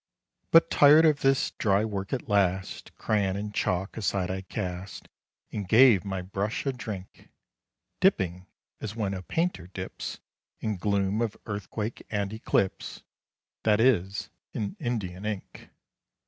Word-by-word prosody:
But 165 - +6
tired 150 +3 +7
of 150 -2 +4
this 135 -1 +2
dry 100 0 +3
work 100 -3 -4
at 130 - -3
last, 95 -3 0
Crayon 100 -3 +1
and 105 +1 -4
chalk 95 -1 -1
aside 100 -4 -1
I 95 0 -3
cast, 95 -1 -5 0.4
And 100 -3 -4
gave 110 -3 +6
my 95 -2 -3
brush 100 +6 -3
a 135 - 0
drink! 105 -6 -8 0.7
Dipping 95 - +2 0.3
"as 110 -1 -5
when 105 -4 -1
a 95 - -4
painter 160 - -1
dips 95 0 -6 0.4
In 105 -2 -2
gloom 100 +2 0
of 115 -3 -1
earthquake 105 +1 -4
and 100 -1 -2
eclipse," 105 -3 -1 0.6
That 105 -1 +3
is 100 -6 +2 0.2
in 105 -2 -3
Indian 105 - -3
ink. 105 -2 -6
100 Hz, 135 wpm, -28 LUFS, 95-110 Hz, 0.7 s, tired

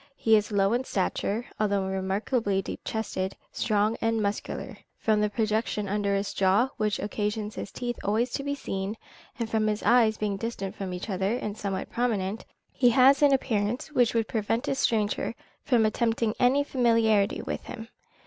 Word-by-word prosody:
He 225 -4 +4
is 210 0 +1
low 200 +1 +2
in 245 +2 +1
stature, 210 +1 -1
although 200 -2 +1
remarkably 195 +2 0
deep 195 - -5
chested, 195 -4 -3
strong, 215 0 +1
and 225 0 +1
muscular. 205 -1 -3 0.2
From 215 -1 +2
the 210 - +2
projection 215 -1 -1
of 195 - -5
his - - +1
under 200 -1 +1
jaw, 195 +7 +3
which 210 -3 0
occasions 210 +1 -2
his 200 - -6
teeth 240 -1 -4
always 225 +5 +1
to - - -2
be 285 0 -2
seen, 195 -5 -4 0.4
and 230 -3 -2
from 220 -1 +1
his 210 0 -1
eyes 225 -3 +4
being 205 -2 -1
distant 195 -3 -4
from 195 -3 -5
each 180 0 -5
other, 195 +2 0
and 210 -4 -4
somewhat 200 -3 -4
prominent, 220 -4 -1 0.3
he 245 -2 +4
has 265 +3 +5
an 290 -1 +6
appearance 240 -1 0
which 245 -5 +2
would 225 -1 +1
prevent 225 +1 -1
a - - +1
stranger 225 -3 0 0.3
from 240 -5 +3
attempting 225 0 +1
any 265 +3 +4
familiarity 230 -6 +2
with - - -4
him. 225 -2 -8
215 Hz, 175 wpm, -27 LUFS, 200-235 Hz, 0.4 s, an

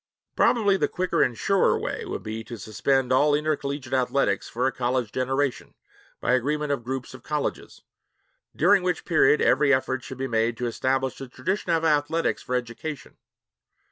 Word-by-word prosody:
Probably 205 -5 +3
the - - +1
quicker 185 -1 -1
and 120 -2 +1
surer 195 - +2
way - - -4
would - - -5
be 110 +1 -5
to 120 - -8
suspend 130 +5 0
all 145 +3 +4
intercollegiate 145 -3 -2
athletics 130 +1 +1
for 125 +2 -1
a 135 - +2
college 125 -2 -1
generation 135 +1 -2 0.4
by - - +1
agreement 145 +4 0
of 140 -4 -2
groups 130 +1 -5
of 130 - -11
colleges 150 +2 -4 0.7
during 195 +5 +4
which 180 0 -2
period 155 -3 +4
every 145 -2 +4
effort 130 -2 +1
should 130 - -8
be 135 - -2
made 115 -1 0
to 125 - -3
establish 130 +2 -1
the 135 - -7
tradition 175 +9 -2
of 165 -1 +1
athletics 155 +2 +1
for 125 - -3
education. 125 +5 -5
135 Hz, 170 wpm, -25 LUFS, 125-150 Hz, 0.7 s, all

